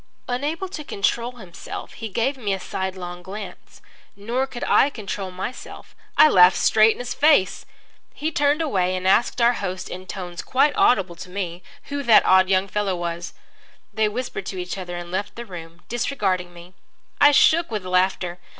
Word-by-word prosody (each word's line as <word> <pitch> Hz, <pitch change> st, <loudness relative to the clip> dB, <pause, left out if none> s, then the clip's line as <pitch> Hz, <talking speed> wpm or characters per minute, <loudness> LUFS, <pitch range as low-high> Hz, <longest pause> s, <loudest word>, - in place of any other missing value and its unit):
Unable 290 Hz, +9 st, -2 dB
to 345 Hz, -5 st, -7 dB
control 235 Hz, +1 st, -1 dB
himself, 190 Hz, -8 st, -9 dB
he 225 Hz, -, -7 dB
gave 240 Hz, +7 st, 0 dB
me 210 Hz, -7 st, -2 dB
a -, -, -7 dB
sidelong 185 Hz, -2 st, -5 dB
glance. 195 Hz, +4 st, -10 dB, 0.3 s
Nor 235 Hz, +6 st, -2 dB
could 240 Hz, -, -7 dB
I 275 Hz, -, +4 dB
control 200 Hz, -6 st, -5 dB
myself. 185 Hz, +7 st, -8 dB, 0.2 s
I -, -, +9 dB
laughed 180 Hz, -8 st, +6 dB
straight 220 Hz, 0 st, +5 dB
in -, -, -15 dB
his 245 Hz, -1 st, -4 dB
face. 290 Hz, -11 st, +3 dB, 0.5 s
He 310 Hz, +2 st, -2 dB
turned 290 Hz, +1 st, +2 dB
away 185 Hz, -, 0 dB
and 185 Hz, 0 st, -2 dB
asked 230 Hz, +6 st, +3 dB
our 235 Hz, +1 st, +4 dB
host, 185 Hz, -4 st, -5 dB
in 185 Hz, +1 st, -8 dB
tones 180 Hz, -3 st, -6 dB
quite 275 Hz, +2 st, +2 dB
audible 190 Hz, -7 st, +3 dB
to 180 Hz, -, -9 dB
me, 180 Hz, -2 st, -5 dB, 0.3 s
who 285 Hz, 0 st, -3 dB
that 235 Hz, -5 st, +5 dB
odd 185 Hz, 0 st, +5 dB
young 190 Hz, 0 st, +2 dB
fellow 200 Hz, -1 st, -1 dB
was. 175 Hz, 0 st, -5 dB, 0.6 s
They 215 Hz, 0 st, +1 dB
whispered 235 Hz, -4 st, -5 dB
to 190 Hz, -, -5 dB
each 180 Hz, 0 st, -4 dB
other 180 Hz, -2 st, -6 dB
and 175 Hz, 0 st, -8 dB
left 195 Hz, +2 st, -3 dB
the 235 Hz, -, -7 dB
room, 170 Hz, -3 st, -10 dB
disregarding 200 Hz, -7 st, -1 dB
me. 175 Hz, +1 st, -14 dB, 0.5 s
I 290 Hz, -, +8 dB
shook 330 Hz, +4 st, +4 dB
with 210 Hz, -4 st, -4 dB
laughter. 185 Hz, -1 st, 0 dB
195 Hz, 175 wpm, -23 LUFS, 180-245 Hz, 0.6 s, I